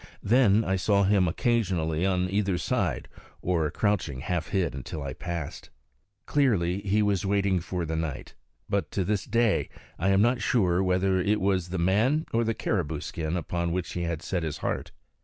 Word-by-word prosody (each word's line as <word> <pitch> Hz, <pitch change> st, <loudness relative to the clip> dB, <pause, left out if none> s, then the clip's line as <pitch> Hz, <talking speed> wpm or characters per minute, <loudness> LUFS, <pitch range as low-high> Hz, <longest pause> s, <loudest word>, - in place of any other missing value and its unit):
Then 110 Hz, -1 st, +4 dB
I 95 Hz, 0 st, +1 dB
saw 100 Hz, +2 st, +2 dB
him 95 Hz, -2 st, +3 dB
occasionally 90 Hz, -5 st, 0 dB
on 90 Hz, -1 st, +1 dB
either 100 Hz, -1 st, 0 dB
side, -, -, -1 dB, 0.3 s
or 85 Hz, -4 st, 0 dB
crouching 90 Hz, -12 st, -1 dB
half 85 Hz, +1 st, -2 dB
hid 90 Hz, -5 st, 0 dB
until 70 Hz, +4 st, -6 dB
I 70 Hz, -1 st, -4 dB
passed. 85 Hz, +1 st, -6 dB, 0.6 s
Clearly 100 Hz, -11 st, +2 dB
he 105 Hz, +2 st, +1 dB
was 100 Hz, -3 st, +1 dB
waiting 100 Hz, -1 st, +1 dB
for 90 Hz, 0 st, -3 dB
night; 80 Hz, -2 st, -4 dB, 0.3 s
but 100 Hz, -1 st, -1 dB
to 95 Hz, -, 0 dB
this 100 Hz, -1 st, -1 dB
day 115 Hz, -3 st, +1 dB, 0.3 s
I 95 Hz, +4 st, +1 dB
am 95 Hz, 0 st, +4 dB
not 120 Hz, +1 st, +2 dB
sure 95 Hz, -6 st, +2 dB
whether 95 Hz, 0 st, +2 dB
it 105 Hz, +3 st, +1 dB
was 95 Hz, -3 st, 0 dB
the 95 Hz, -, -3 dB
man 110 Hz, -, +2 dB
or 115 Hz, +1 st, +3 dB
the 115 Hz, -1 st, -1 dB
caribou 80 Hz, -8 st, -1 dB
skin 80 Hz, +2 st, -3 dB
upon 85 Hz, 0 st, -2 dB
which 90 Hz, -1 st, -3 dB
he 90 Hz, -, -3 dB
had 85 Hz, -2 st, -3 dB
set 90 Hz, -, -2 dB
his 80 Hz, -2 st, -3 dB
heart. -, -, -2 dB
95 Hz, 175 wpm, -27 LUFS, 85-100 Hz, 0.6 s, Then